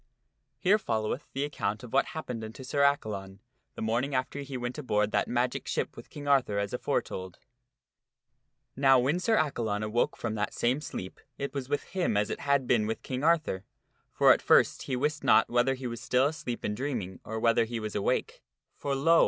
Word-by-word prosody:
HERE 195 +10 +3
followeth 110 - -2
the 135 - -2
account 110 -7 -2
of 120 - -10
what 135 - +4
happened 125 -8 -4
unto 110 +4 -8
Sir 140 +2 -1
Accalon 105 -9 0 0.4
the - - -4
morning 120 +5 0
after 130 +2 -1
he 140 -2 -5
went 120 +3 -4
aboard 105 -6 +1
that 105 - +1
magic 125 +1 -1
ship - - -2
with - - -11
King 145 -1 -8
Arthur 130 -7 +3
as 100 0 -1
aforetold. 95 -1 -2 1.4
Now 135 0 +5
when 140 +8 +2
Sir 225 +4 +2
Accalon 110 -9 0
awoke 105 +3 0
from 115 -2 -3
that 105 -1 -2
same 125 +5 +1
sleep 95 -10 -6 0.2
it 140 - -4
was 135 -2 -4
with 145 - 0
him 180 - -1
as 105 - +1
it - - -3
had 140 -2 +2
been 115 -4 +2
with 110 - -3
King 130 +1 -4
Arthur; 160 - +2 0.5
for, - - +6
at - - -2
first, - - +4
he 130 - -2
wist 150 +4 -1
not - - +5
whether 125 +2 +3
he 130 0 -8
was 115 -2 -4
still 125 +3 +2
asleep 145 -5 -3
and 105 - -1
dreaming 115 -9 -3
or 110 0 -4
whether 115 0 +3
he 115 0 -4
was 110 -1 -4
awake. 100 - -1 0.3
For, 140 -1 -2
lo 165 +5 +5
125 Hz, 200 wpm, -29 LUFS, 110-140 Hz, 1.4 s, for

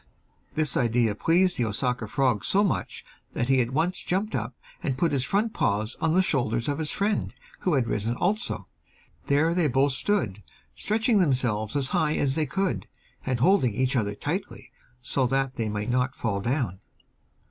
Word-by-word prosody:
This 155 -1 +2
idea 115 -2 +2
pleased 175 - +2
the 120 - +2
Osaka 120 +1 -1
frog 125 -4 +1
so 200 - +3
much 200 - -2 0.3
that 120 - -2
he 135 -1 +4
at 120 - -1
once 160 +7 0
jumped 200 +4 -1
up 120 +1 -3 0.3
and 130 -2 -2
put 170 +4 +1
his 135 -3 +1
front 210 - 0
paws 105 +3 0
on 165 0 +2
the 190 - +4
shoulders 120 -8 0
of 145 0 -1
his 155 -1 -1
friend, 205 +1 -1 0.2
who 180 -5 +1
had 130 -3 +2
risen 115 +1 -1
also. 205 - -1 0.6
There 150 +4 +3
they 175 -3 +2
both 135 +1 +2
stood, 130 - 0 0.3
stretching 220 +1 +1
themselves 125 - +1
as 135 -2 +1
high 155 -4 +1
as 135 -2 +1
they 155 0 0
could, 190 +6 -2 0.4
and 125 -2 -1
holding 140 - +3
each 130 +2 0
other 105 -4 0
tightly, 180 - -5 0.3
so 130 +1 +2
that 135 +1 -1
they 110 -2 -1
might 105 +2 -2
not 125 +2 0
fall 105 -4 -2
down. 115 - -1
135 Hz, 180 wpm, -26 LUFS, 120-170 Hz, 0.6 s, he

